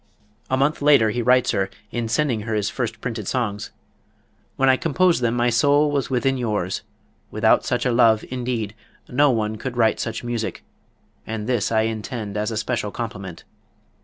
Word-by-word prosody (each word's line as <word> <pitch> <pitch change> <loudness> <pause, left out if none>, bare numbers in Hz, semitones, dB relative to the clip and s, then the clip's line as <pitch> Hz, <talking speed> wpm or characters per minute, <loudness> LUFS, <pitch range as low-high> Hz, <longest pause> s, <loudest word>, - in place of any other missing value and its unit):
A 130 - +1
month 140 +3 +1
later 140 -7 +5
he 120 - -1
writes 125 +1 +3
her, 95 -1 0 0.2
in 120 -1 -2
sending 120 0 +1
her 110 +1 -3
his 105 -1 0
first 115 -3 -4
printed 110 -5 -4
songs: 105 -6 -2 0.9
"When 135 - +2
I 130 - +6
composed 165 +2 +2
them 120 0 +1
my 120 0 +2
soul 145 +5 +3
was 140 -2 -1
within 135 +1 +1
yours; 105 -6 -2 0.5
without - - +3
such 125 +1 -1
a 125 - +2
love, 115 -2 +4
indeed, 120 -4 -3 0.3
no 145 +3 +3
one 110 -3 0
could 125 +2 -5
write 110 -2 +3
such 115 0 -4
music 120 -2 -3 0.6
and 110 -1 -4
this 120 -4 0
I 110 -1 +3
intend 110 -1 -4
as 105 +1 -1
a 110 - -3
special 110 -1 -2
compliment." 100 -6 -6
120 Hz, 175 wpm, -22 LUFS, 110-130 Hz, 0.9 s, I